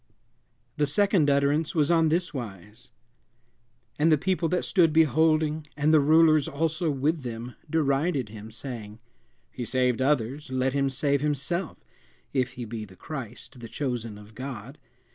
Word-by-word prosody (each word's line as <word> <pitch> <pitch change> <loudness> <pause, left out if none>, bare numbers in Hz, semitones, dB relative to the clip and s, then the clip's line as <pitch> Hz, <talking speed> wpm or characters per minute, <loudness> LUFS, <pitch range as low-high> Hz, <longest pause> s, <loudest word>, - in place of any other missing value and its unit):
The 150 -1 +2
second 185 -1 +3
utterance 145 +4 +1
was 150 0 +3
on 165 -2 +4
this 175 +2 0
wise: 110 0 -8 1.1
"And 160 +2 +4
the 155 - +5
people 180 +1 0
that 180 - 0
stood 170 -4 +3
beholding, 155 0 +2
and 150 +2 +3
the 155 - +7
rulers 155 0 +5
also 160 +3 -1
with 150 +3 0
them, 120 0 -6 0.2
derided 140 -3 +1
him, 110 0 -9
saying, 110 -3 -8 0.5
He 125 - -5
saved 125 0 +1
others; 135 +1 0
let 130 0 0
him 140 -1 +1
save 140 +1 0
himself, 150 +4 -2 0.6
if 130 -3 0
he 125 - -6
be 110 0 -6
Christ, 125 +4 -8
the 115 -1 -9
chosen 115 -4 -3
of 105 +1 -14
God. 130 +2 -7
140 Hz, 145 wpm, -26 LUFS, 125-155 Hz, 1.1 s, the